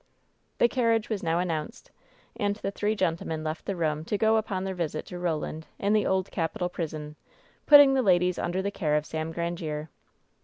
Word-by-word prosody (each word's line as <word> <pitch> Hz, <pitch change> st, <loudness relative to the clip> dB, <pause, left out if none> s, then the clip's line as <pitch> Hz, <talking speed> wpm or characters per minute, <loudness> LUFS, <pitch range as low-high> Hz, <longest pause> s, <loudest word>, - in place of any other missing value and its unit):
The -, -, +5 dB
carriage 230 Hz, -3 st, +1 dB
was 215 Hz, -3 st, -2 dB
now 165 Hz, 0 st, 0 dB
announced, 165 Hz, -4 st, -3 dB, 0.4 s
and 205 Hz, -3 st, 0 dB
the 200 Hz, -1 st, -4 dB
three 210 Hz, +2 st, -1 dB
gen 175 Hz, -5 st, +1 dB
tlemen 160 Hz, -2 st, -5 dB
left 155 Hz, +1 st, -4 dB
the 200 Hz, -, -1 dB
room 155 Hz, -3 st, -1 dB
to 205 Hz, -, -1 dB
go 220 Hz, +1 st, +3 dB
upon 200 Hz, -4 st, -2 dB
their 190 Hz, 0 st, -3 dB
visit 160 Hz, -4 st, -3 dB
to 180 Hz, -, -8 dB
Roland, 160 Hz, -2 st, -3 dB
in 200 Hz, +1 st, +1 dB
the 215 Hz, -1 st, +2 dB
Old 190 Hz, 0 st, 0 dB
Capitol 175 Hz, +1 st, -2 dB
prison, 155 Hz, -3 st, -5 dB, 0.5 s
putting 285 Hz, -2 st, +9 dB
the 265 Hz, -, +3 dB
ladies 180 Hz, -4 st, +3 dB
under 185 Hz, +2 st, -1 dB
the 200 Hz, -, -1 dB
care 155 Hz, -7 st, 0 dB
of 150 Hz, 0 st, 0 dB
Sam 160 Hz, +1 st, -4 dB
Grandiere. 165 Hz, -2 st, -4 dB
180 Hz, 195 wpm, -27 LUFS, 160-205 Hz, 0.5 s, putting